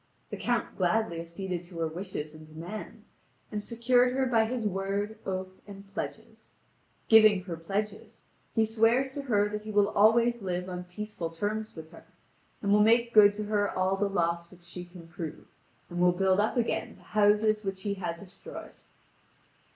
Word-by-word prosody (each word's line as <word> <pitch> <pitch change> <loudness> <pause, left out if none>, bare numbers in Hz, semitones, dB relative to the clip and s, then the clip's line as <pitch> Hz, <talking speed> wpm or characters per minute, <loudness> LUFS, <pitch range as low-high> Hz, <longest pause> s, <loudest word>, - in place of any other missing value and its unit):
The - - -4
Count 240 -1 -1
gladly 180 -1 +1
acceded 175 +1 -5
to 175 -1 -12
her 165 -1 0
wishes 160 -2 -5
and 155 0 -13
demands, 165 +7 -9 0.4
and 210 -1 -3
secured 245 +2 +2
her 265 0 +1
by 230 -3 +3
his 235 0 -3
word, 200 +2 -2
oath, 185 0 -4
and 195 0 -12
pledges. - - -7 0.5
Giving 215 -4 +7
her 180 -3 -5
pledges, 210 +6 -4 0.3
he 225 - +4
swears 230 +4 +2
to 285 - -4
her 210 -7 +2
that 210 0 -4
he 215 - -9
will 205 -1 +3
always 230 +3 +4
live 180 -1 -3
on 180 -1 -5
peaceful 180 -2 -5
terms 210 +6 -3
with 160 -1 -10
her, 165 - -14 0.6
and 200 - +1
will 210 - +5
make 235 +2 +4
good 205 -1 +7
to 210 - -3
her 205 -1 +1
all 185 +1 +1
the 200 +1 0
loss 170 -2 0
which 180 -1 -18
she 175 +1 -8
can 175 -1 -13
prove, 165 -2 -7 0.4
and 175 - -5
will 180 0 +5
build 190 +1 +2
up 215 +5 +1
again 235 - -1
the - - -20
houses 210 +1 +3
which 195 -1 -4
he 205 -2 -1
had 175 -4 -4
destroyed. 200 - -10
200 Hz, 180 wpm, -29 LUFS, 180-220 Hz, 0.6 s, Giving